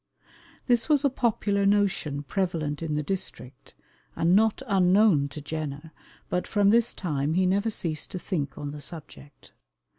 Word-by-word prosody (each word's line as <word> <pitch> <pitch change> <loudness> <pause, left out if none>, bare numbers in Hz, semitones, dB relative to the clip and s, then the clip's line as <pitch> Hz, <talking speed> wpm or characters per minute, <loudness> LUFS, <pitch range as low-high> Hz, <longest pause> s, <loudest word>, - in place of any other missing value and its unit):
This 240 +3 +2
was 290 -2 +3
a 280 - +3
popular 215 -5 0
notion 195 -8 +1
prevalent 165 -4 -2
in 155 -2 -2
the 150 - -1
district, 145 -7 -5 0.4
and 170 +2 +3
not 220 +4 +2
unknown 190 - +4
to 150 +2 -8
Jenner, 155 0 -5 0.4
but 180 - -2
from 205 -1 +3
this 235 +1 +3
time 150 -3 -1
he 185 +1 +3
never 200 +4 +1
ceased 160 -7 -3
to - - -5
think 160 -6 -3
on 145 -1 -5
the 145 0 -8
subject. 145 -2 -11
180 Hz, 155 wpm, -26 LUFS, 150-205 Hz, 0.4 s, unknown